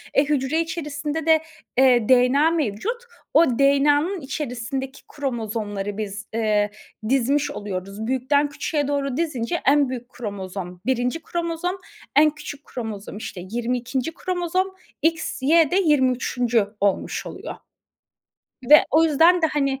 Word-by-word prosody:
Eee, 280 - +5
hücre 285 +1 +1
içerisinde 305 -1 -4
de, 320 -1 +5 0.4
eee, 250 -4 +4
DNA 260 +5 +5
mevcut. 330 - -2 0.3
O 330 - +7
DNA'nın 290 +6 +3
içerisindeki 265 -1 -4
kromozomları 215 -6 -4
biz, 210 0 -5
ııı, 210 -2 +1 0.4
dizmiş 275 +3 +2
oluyoruz. 195 +2 -5
Büyükten 265 +3 +1
küçüğe 290 0 -2
doğru 280 -2 -1
dizince 310 -1 -2
en 285 -1 +4
büyük 245 -1 -6
kromozom 190 -6 -6
1. 250 +4 0
kromozom, 340 +2 -3 0.4
en 305 +2 +7
küçük 295 -1 -9
kromozom, 215 -4 -6
işte, 195 -4 -7
22. 245 +5 -2
kromozom, 365 +1 -1 0.3
XY 320 -1 +2
de - - +1
23. 250 -6 +2
olmuş 200 -1 0
oluyor. - - -7 1.2
Ve 300 - +9
o 320 +2 +5
yüzden 330 +3 +4
de, - - +5
hani, 275 -3 -1
270 Hz, 120 wpm, -23 LUFS, 230-310 Hz, 1.2 s, Ve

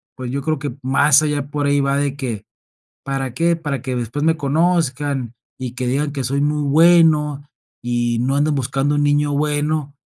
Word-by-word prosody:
pues, 125 -1 -6
yo 140 - -2
creo 155 -2 -1
que 145 0 -5
más 140 +2 +4
allá 145 -2 -1
por 145 -1 -1
ahí 145 0 +2
va 140 0 +1
de 140 -1 -1
que: 120 -7 -5 0.6
"¿Para 135 -2 -3
qué? 170 +5 +1
Para 145 -4 -4
que 130 -2 -3
después 125 +5 -3
me 160 0 +3
conozcan 145 -4 0 0.2
y 130 -2 -5
que 125 0 -3
digan 140 +3 -1
que 135 -3 -4
soy 140 +3 -1
muy 150 0 0
bueno, 150 -1 +4 0.4
y 120 -1 -1
no 135 +3 0
andan 150 +1 +1
buscando 135 +2 -1
un 145 - +1
niño 145 0 +2
bueno", 150 0 -1
145 Hz, 190 wpm, -19 LUFS, 130-150 Hz, 0.6 s, más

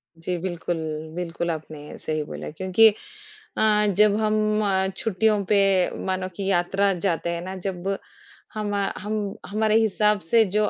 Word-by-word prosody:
जी, 175 +2 -3
बिल्कुल, 175 -1 -3 0.4
बिल्कुल, 170 -1 -2
आपने 155 -2 -8
सही 155 -1 -2
बोला - - -7
क्योंकि 195 +4 +5 0.6
अ, 210 -1 +4
जब 210 -1 +5
हम 215 0 +1 0.3
छुट्टियों 215 -1 +1
पे 205 - +5 0.5
मानो 185 0 -1
कि 200 - -4
यात्रा 195 +3 +2
जाते 170 -2 -1
हैं 170 0 -2
ना, 185 +2 -6
जब 190 +1 -3 0.6
हमा 205 -1 -2 0.2
हम 210 +2 -4 0.3
हमारे 215 +2 +1
हिसाब 210 -1 +2
से 225 +8 +4
जो 210 0 +3
195 Hz, 140 wpm, -24 LUFS, 175-210 Hz, 0.6 s, क्योंकि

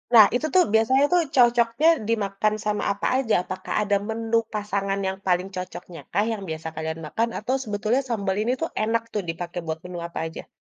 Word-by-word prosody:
Nah, 215 -2 +11
itu 305 - 0
tuh 365 - +7
biasanya 260 +6 +4
tuh 350 - +5
cocoknya 240 +4 +4 0.2
dimakan 215 -1 0
sama 210 0 0
apa 200 - -2
aja? 235 -5 0
Apakah 185 +1 -5
ada 205 -1 +1
menu 225 +1 -2 0.2
pasangan 200 -1 -1
yang 190 0 -2
paling 180 +1 +2
cocoknya 180 -1 -7
kah 205 +4 +2
yang 205 -3 -4
biasa 160 0 -5
kalian 160 +1 -4
makan, 230 +9 0
atau 255 +5 -1
sebetulnya 215 +4 0
sambal 200 -4 -1
ini 240 - +1
tuh 330 - +1
enak 225 +1 +1
tuh 210 - 0
dipakai 175 +1 -4
buat 160 0 -3
menu 180 -1 -6
apa 170 - -6
aja? 160 - -9
210 Hz, 190 wpm, -24 LUFS, 185-230 Hz, 0.2 s, Nah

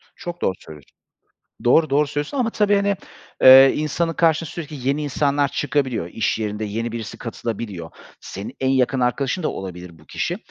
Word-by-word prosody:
Çok 175 0 -7
doğru 95 - 0
söylüyorsun. 75 -3 -14 0.7
Doğru, 155 +5 +4
doğru 145 +2 +3
söylüyorsun 145 - -4
ama 240 -3 +1
tabii, 205 -2 +2
hani, 200 0 +1 0.5
eee, 135 +1 +9
insanın 165 +2 -1
karşısına 165 -2 +1
sürekli 140 -4 -6
yeni 140 +2 0
insanlar 145 0 +1
çıkabiliyor. 135 - -1
İş 110 +6 -1
yerinde 105 0 -3
yeni 115 +3 -3
birisi 115 -2 -6
katılabiliyor. 110 -7 -5 0.3
Senin 100 +2 -8
en 130 - +1
yakın 130 0 +1
arkadaşın 130 +7 0
da - - 0
olabilir 90 -3 -7
bu 80 - -20
kişi. - - -3
135 Hz, 165 wpm, -21 LUFS, 110-150 Hz, 0.7 s, eee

